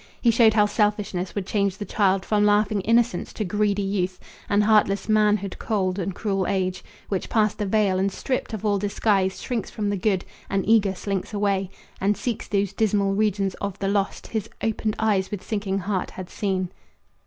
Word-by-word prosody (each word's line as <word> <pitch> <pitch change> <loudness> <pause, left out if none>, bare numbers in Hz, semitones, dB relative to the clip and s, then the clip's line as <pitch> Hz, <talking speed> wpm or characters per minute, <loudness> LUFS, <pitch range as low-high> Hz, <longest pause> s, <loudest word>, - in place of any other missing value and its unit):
He 235 - +4
showed 225 -1 +5
how 210 -1 +5
selfishness 205 -3 -1
would 200 -2 -2
change 200 -2 0
the 205 - -5
child 195 -3 +1
From 210 -1 +2
laughing 210 0 +3
innocence 230 -2 +1
to 215 - -3
greedy 205 +1 +1
youth 190 -2 -1 0.3
And 205 0 +3
heartless 210 -2 +3
manhood, 210 -3 +2
cold 190 -3 -1
and 190 0 -3
cruel 195 -3 -1
age, 185 -2 -1 0.2
Which 195 -3 -3
past 215 -2 +1
the 205 - -1
vale 195 -2 +2
and 195 +1 +1
stript 255 +6 -3
of 220 -1 -5
all 205 -1 +2
disguise 200 -1 +1
Shrinks 240 -5 -3
from 205 -2 -2
the 200 - -1
good, 190 -1 0 0.2
and 195 -1 -1
eager 210 -3 +4
slinks 195 +2 -3
away 200 -2 0 0.3
And 200 +2 +1
seeks 240 -3 -3
those 200 -2 0
dismal 200 -2 +1
regions 200 -2 +1
of 200 -1 -3
the 195 - -2
lost 200 0 -1
His 220 -1 -3
opened 220 -1 -1
eyes 205 -4 +1
with 205 -3 -5
sinking 200 -3 -2
heart 190 -1 -2
had 185 -1 -9
seen. 185 -3 -1
200 Hz, 190 wpm, -24 LUFS, 195-215 Hz, 0.3 s, showed